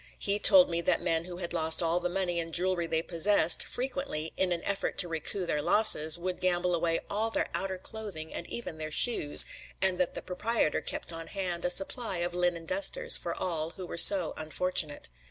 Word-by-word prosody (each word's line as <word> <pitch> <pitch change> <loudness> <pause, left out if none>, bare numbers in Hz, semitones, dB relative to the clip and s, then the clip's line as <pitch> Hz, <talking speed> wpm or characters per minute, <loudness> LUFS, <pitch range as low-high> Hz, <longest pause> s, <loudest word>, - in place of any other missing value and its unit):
He 200 +1 0
told 280 +3 +7
me 170 0 -2
that - - 0
men 165 -1 -1
who 180 -1 -9
had 175 -1 -5
lost 160 0 +2
all 165 +1 0
the 180 0 -3
money 175 -1 -2
and 165 0 -6
jewelry 180 -1 +1
they 160 0 -2
possessed, 170 0 +2
frequently, 250 - -2
in 190 -1 -1
an 170 -1 -3
effort 200 -1 -3
to 180 - +3
recoup 165 +3 -3
their 150 -3 -2
losses, 160 -4 +4
would 180 +1 -5
gamble 180 -1 0
away 165 -1 -1
all 220 +2 -3
their - - -2
outer 190 -1 -3
clothing 185 -6 -8
and 170 - -7
even 200 -9 -7
their 155 0 -6
shoes; 155 -3 +5 0.3
and 190 -1 0
that 180 - -1
the - - -6
proprietor 195 -1 -1
kept - - -4
on 165 0 -8
hand 180 -4 -5
a - - +1
supply 195 +3 +1
of 175 0 -3
linen 175 -2 -2
dusters 485 - +2
for - - -3
all 160 -3 -4
who 185 - -7
were - - -8
so 175 0 +4
unfortunate. 155 - -1
175 Hz, 205 wpm, -28 LUFS, 165-195 Hz, 0.3 s, told